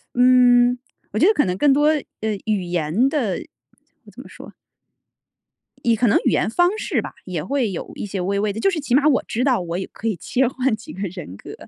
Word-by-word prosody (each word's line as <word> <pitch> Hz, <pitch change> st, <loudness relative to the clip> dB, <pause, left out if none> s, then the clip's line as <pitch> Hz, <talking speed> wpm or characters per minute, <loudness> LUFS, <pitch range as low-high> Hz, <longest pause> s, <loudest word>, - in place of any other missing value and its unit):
嗯， 245 Hz, 0 st, +5 dB, 0.3 s
我 215 Hz, -, -2 dB
觉 360 Hz, -, +5 dB
得 435 Hz, -, +5 dB
可 295 Hz, -, +2 dB
能 180 Hz, 0 st, -2 dB
更 285 Hz, +2 st, +4 dB
多， 295 Hz, +2 st, +3 dB, 0.3 s
呃， 215 Hz, -2 st, -1 dB
语 210 Hz, -4 st, 0 dB
言 175 Hz, -, 0 dB
的 240 Hz, -, -1 dB, 0.8 s
怎 -, -, -10 dB
么 -, -, -13 dB
说 -, -, -12 dB, 1.3 s
也 230 Hz, -1 st, +3 dB
可 235 Hz, +2 st, +1 dB
能 -, -, +4 dB
语 -, -, +3 dB
言 -, -, +1 dB
方 350 Hz, -, +2 dB
式 -, -, -1 dB
吧， -, -, -8 dB
也 175 Hz, -5 st, -4 dB
会 260 Hz, -6 st, -1 dB
有 175 Hz, -, -6 dB
一 -, -, -5 dB
些 195 Hz, -1 st, -5 dB
微 200 Hz, +2 st, -1 dB
微 210 Hz, 0 st, 0 dB
的 220 Hz, -, -6 dB
就 390 Hz, -, +3 dB
是 350 Hz, -, -2 dB
起 265 Hz, -4 st, 0 dB
码 290 Hz, +2 st, +4 dB
我 275 Hz, -, +3 dB
知 240 Hz, +3 st, -1 dB
道 255 Hz, -8 st, +2 dB
我 170 Hz, 0 st, -4 dB
也 190 Hz, -, -4 dB
可 225 Hz, -, -5 dB
以 215 Hz, -, 0 dB
切 255 Hz, +9 st, 0 dB
换 255 Hz, -2 st, 0 dB
几 220 Hz, -, -12 dB
个 190 Hz, -, -9 dB
人 170 Hz, -, -9 dB
格， -, -, -10 dB
230 Hz, 245 characters per minute, -21 LUFS, 195-265 Hz, 1.3 s, 嗯